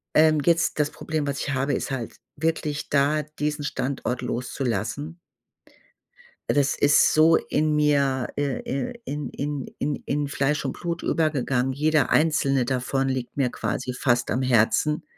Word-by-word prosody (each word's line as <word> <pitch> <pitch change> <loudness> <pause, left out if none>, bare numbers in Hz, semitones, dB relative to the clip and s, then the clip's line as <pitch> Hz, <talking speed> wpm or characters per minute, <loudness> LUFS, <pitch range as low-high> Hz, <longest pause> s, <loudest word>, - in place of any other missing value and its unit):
ähm, 155 0 +5
jetzt 170 -2 +2
das 145 -1 +1
Problem, 155 -2 -3
was 140 -1 -2
ich 145 - -2
habe, 135 +2 0
ist - - -2
halt 125 -4 -4 0.2
wirklich 155 -2 -2
da 145 +2 +2 0.2
diesen 150 0 -1
Standort 130 -3 -2
loszulassen. 125 +5 -3 1.3
Das 145 0 +2
ist 145 0 +5
so 160 +1 +5
in 155 0 0
mir 140 -4 +2
ir 145 -2 -2
ir 140 - -2
in 145 +1 -4
in 145 -1 -4
in 145 0 -1
in 145 0 -1
Fleisch 140 +1 0
und 135 - -2
Blut 170 0 -3
übergegangen. 135 -5 0
Jeder 150 +1 +2
einzelne 140 -4 +2
davon 130 +2 -1
liegt 130 -1 -3
mir 130 -3 +1
quasi 120 +4 -3
fast 120 -1 +1
am 125 +4 0
Herzen. 130 +5 +2
140 Hz, 150 wpm, -24 LUFS, 130-150 Hz, 1.3 s, ähm